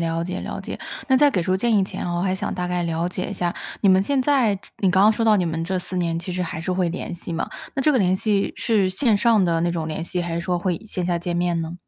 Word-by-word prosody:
了 165 0 -1
解 185 +1 -4
了 - - -5
解。 - - -6 0.3
那 265 - +5
在 290 +1 +5
给 180 -8 0
出 185 +2 +1
建 230 +2 +2
议 195 - +3
前 190 - -5
哦， 175 0 -2
我 - - -1
还 185 0 +1
想 205 +2 -3
大 180 -1 -2
概 180 0 -1
了 165 +1 -1
解 185 +1 -4
一 - - -5
下， 175 -1 -1 0.3
你 200 - +5
们 190 0 +5
现 275 +3 +1
在 250 -8 +2 0.2
你 190 -2 +2
刚 190 0 +4
刚 215 +1 +6
说 230 - -2
到 215 -1 +5
你 185 - +1
们 165 0 -2
这 185 +2 -1
4 180 +1 -5
年 165 -1 0
其 175 +2 -5
实 180 0 -1
还 165 -1 -4
是 185 +2 -2
会 180 -1 +1
联 175 0 -5
系 170 0 -7
嘛， 165 - -3 0.2
那 270 - 0
这 300 - +4
个 255 - +3
联 185 -2 +3
系 205 -1 0
是 210 -5 +2
线 220 +4 +2
上 215 -2 +4
的 165 -1 +1
那 175 0 +1
种 165 -2 -2
联 160 0 -4
系， 175 +1 -3
还 170 -1 -4
是 170 - -1
说 180 0 -1
会 175 -1 -1
线 185 -4 -3
下 175 -1 0
见 175 0 -3
面 175 -1 +1
呢？ 165 +1 -5
180 Hz, 325 characters per minute, -23 LUFS, 170-200 Hz, 0.3 s, 刚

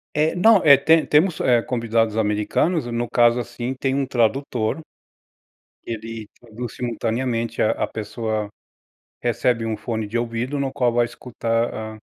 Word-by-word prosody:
É 155 +1 +2
não 220 +5 +6
é 140 -2 +10
te 160 +4 +3
temos, 160 +3 +2
eh, 120 -2 +3
convidados 115 -2 0
americanos, 110 - 0
no 120 0 -2
caso 120 +1 +3
assim, 120 +2 -4
tem 130 0 -1
um 135 -1 0
tradutor, 120 0 0 1.1
ele 115 -1 -6
traduz 120 0 -8
simultaneamente 115 -1 -2
a 110 - +3
a - - -1
pessoa 110 0 -3 0.8
recebe 120 -1 0
um 110 -1 -2
fone 110 -2 -4
de 110 - -4
ouvido 120 +4 -2
no 135 -1 -2
qual 125 -3 +1
vai 120 0 +3
escutar 115 -1 -2
a 110 0 -6
120 Hz, 150 wpm, -22 LUFS, 115-130 Hz, 1.1 s, é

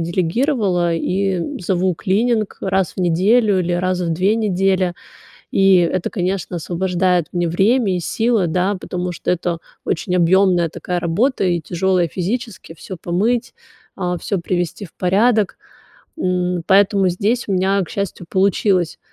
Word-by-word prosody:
делегировала 180 - 0
и, 190 +3 0
м, 285 +10 -5
зову 185 -1 0
клининг 215 +4 0
раз 190 -1 0
в - - -3
неделю 195 +5 +3
или 180 -1 -1
раз 185 +1 0
в 170 -2 -1
2 190 +6 +1
недели. 190 -3 +1 0.6
И 195 -1 +5
это, 175 +1 0
конечно, 185 -2 -2
освобождает 180 0 0
мне 175 -1 0
время 195 +3 +2
и - - -2
силы, 225 +2 +1
да, 185 +4 0
потому 180 -1 -4
что - - -3
это 175 -1 -1 0.3
очень 180 +2 -1
объёмная 180 -1 +3
такая 180 +3 -4
работа 200 +10 0
и 175 -2 +1
тяжёлая 175 +2 0
физически 205 0 -4
всё 185 +3 -9
помыть, 225 +8 0 0.4
а, 180 -2 -2
всё 200 - -2
привести 175 +2 -3
в 175 - -13
порядок. 205 +3 +2 0.6
М, 180 - -1
поэтому 195 -1 +4
здесь 210 +7 0
у - - 0
меня, 195 +1 +2
к 175 - -7
счастью, 200 -3 -4
получилось, 190 -2 +1
185 Hz, 145 wpm, -19 LUFS, 175-200 Hz, 0.6 s, И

